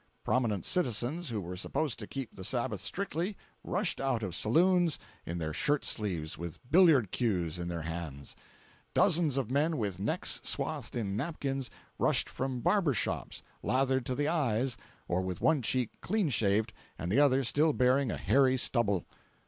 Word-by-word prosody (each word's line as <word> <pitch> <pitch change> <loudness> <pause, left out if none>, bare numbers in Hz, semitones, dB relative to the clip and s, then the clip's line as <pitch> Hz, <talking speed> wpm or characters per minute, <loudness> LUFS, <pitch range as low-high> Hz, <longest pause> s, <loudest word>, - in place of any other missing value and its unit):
Prominent 115 -7 0
citizens 140 +1 0
who 110 -3 -2
were 90 -1 -6
supposed 125 +8 -2
to 105 - -6
keep 135 -5 -6
the 95 - -8
Sabbath 125 +5 -1
strictly, 190 +1 -3 0.3
rushed 190 -3 -1
out 130 -4 0
of 95 -5 -3
saloons 175 - +3 0.3
in 85 - -3
their 80 -2 -3
shirt 145 - +1
sleeves, 85 -8 -2
with 85 -1 -6
billiard 155 - +6
cues 90 -9 0
in 85 - -3
their 85 -2 -4
hands. 80 -4 -5 0.6
Dozens 165 -7 +4
of 130 -3 -1
men 150 +4 +2
with 100 -5 -2
necks 100 - 0
swathed - - -2
in 100 -5 -2
napkins, 135 -1 -2 0.3
rushed - - +2
from 130 -2 -3
barber 170 - +2
shops, 110 - -2 0.2
lathered 130 -1 +1
to 130 - -1
the 145 +2 0
eyes 130 -6 +1 0.3
or 90 +1 0
with 95 -1 -4
one 160 -4 +3
cheek 125 0 0
clean 205 -4 0
shaved 105 -1 +1 0.2
and 85 - -3
the 130 - +4
other 135 -2 +4
still 150 +6 +3
bearing 130 0 +2
a - - -3
hairy 130 -1 +3
stubble. 105 -7 +2
125 Hz, 165 wpm, -31 LUFS, 100-145 Hz, 0.6 s, billiard